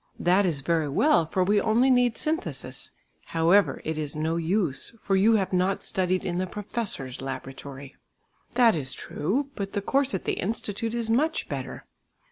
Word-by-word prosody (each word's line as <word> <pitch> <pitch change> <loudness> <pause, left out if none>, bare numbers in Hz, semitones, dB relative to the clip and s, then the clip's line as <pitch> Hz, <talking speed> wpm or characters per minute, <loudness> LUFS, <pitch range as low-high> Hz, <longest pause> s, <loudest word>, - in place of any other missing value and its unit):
"That 185 +2 +3
is 150 -6 -1
very 160 0 0
well, 170 - +3
for 185 +3 +1
we 205 +2 +3
only 235 +4 +3
need 245 -2 +3
synthesis; 320 +3 -3 0.5
however, 175 +5 +3
it 160 0 -2
is 150 0 -3
no 160 +2 -1
use 170 - -1
for 195 -3 0
you 215 +4 +5
have 195 -3 0
not 185 +2 +1
studied 185 0 0
in 175 0 -1
the 185 - -1
professor's 195 - -4
laboratory." 135 +1 -7 0.6
"That 240 -2 +6
is 135 -4 -2
true; 265 - -2
but 195 -4 -5
the 200 - -1
course 270 -1 +1
at 190 - -5
the - - +1
Institute 220 +2 -3
is 235 -2 -1
much 310 +7 +1
better." - - -6
190 Hz, 170 wpm, -26 LUFS, 160-225 Hz, 0.6 s, That